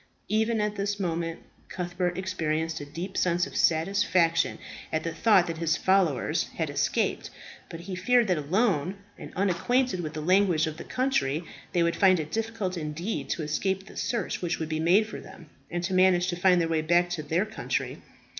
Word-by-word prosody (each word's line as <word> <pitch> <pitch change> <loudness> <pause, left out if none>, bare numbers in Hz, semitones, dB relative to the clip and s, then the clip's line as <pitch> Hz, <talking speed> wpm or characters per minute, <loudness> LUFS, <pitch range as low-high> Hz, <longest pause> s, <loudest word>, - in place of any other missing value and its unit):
Even 220 +1 +1
at 210 0 -1
this 200 +1 -2
moment 165 -2 -2 0.3
Cuthbert 180 -1 -2
experienced 160 -4 -2
a 145 - -7
deep 175 +6 -6
sense 175 0 +2
of - - -10
satisfaction 170 0 +2 0.3
at 160 0 -1
the 165 - -3
thought 205 -6 +4
that 165 -2 -5
his 165 -1 +1
followers 190 -8 +2
had - - -2
escaped. - - 0 0.4
But 165 - -8
he 185 +2 -7
feared 235 +6 +3
that 180 - +2
alone, 185 +1 +1 0.2
and - - -9
unacquainted 200 +5 +1
with 155 -3 -4
the 155 - -3
language 180 -1 +3
of 155 -1 -5
the - - -7
country, 180 - 0 0.3
they 175 - +2
would 170 0 +1
find 185 -3 +5
it 155 0 -5
difficult 220 -5 -2
indeed 165 +7 -4
to 165 - -2
escape 190 +6 -1
the - - -14
search 235 -2 -2
which 175 -1 -1
would 160 -1 -4
be 155 -1 -1
made 180 +7 +4
for 215 - -8
them, 165 -4 -14 0.2
and 175 0 -3
to 190 +1 -2
manage 185 -1 +4
to 175 - -1
find 180 0 +4
their 165 - +1
way 160 -1 +1
back 175 +2 +2
to 175 -3 -2
their 165 +6 0
country. 220 0 -3
175 Hz, 190 wpm, -27 LUFS, 165-195 Hz, 0.4 s, find